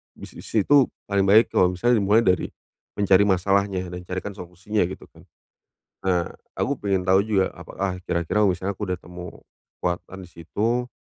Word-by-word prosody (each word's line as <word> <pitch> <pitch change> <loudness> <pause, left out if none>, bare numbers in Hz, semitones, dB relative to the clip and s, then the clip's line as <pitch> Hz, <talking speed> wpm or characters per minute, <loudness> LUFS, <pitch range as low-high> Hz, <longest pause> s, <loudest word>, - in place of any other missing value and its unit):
bisnis - - -11
itu 135 +5 +5 0.2
paling 100 -1 0
baik 110 +4 +5
kalau 90 0 +3
misalnya 120 +4 +2
dimulai 105 +4 +3
dari 90 -3 +2 0.5
mencari 100 0 +4
masalahnya 95 -1 +1
dan 90 - -6
carikan 95 +3 -4
solusinya 90 +1 -3
gitu 95 - -9
kan. - - -19 0.8
Nah, 90 -2 +1 0.2
aku 140 -2 -1
pengen 100 -2 0
tahu 95 +1 +4
juga 95 -4 +1
apakah 95 0 -5
kira-kira 85 +5 +1
misalnya 95 +1 -2
aku 105 - -3
udah 90 - -1
temu 90 0 -10 0.4
kekuatan 90 +2 -3
di 90 - -13
situ, 110 +9 -2
95 Hz, 160 wpm, -24 LUFS, 90-105 Hz, 0.8 s, itu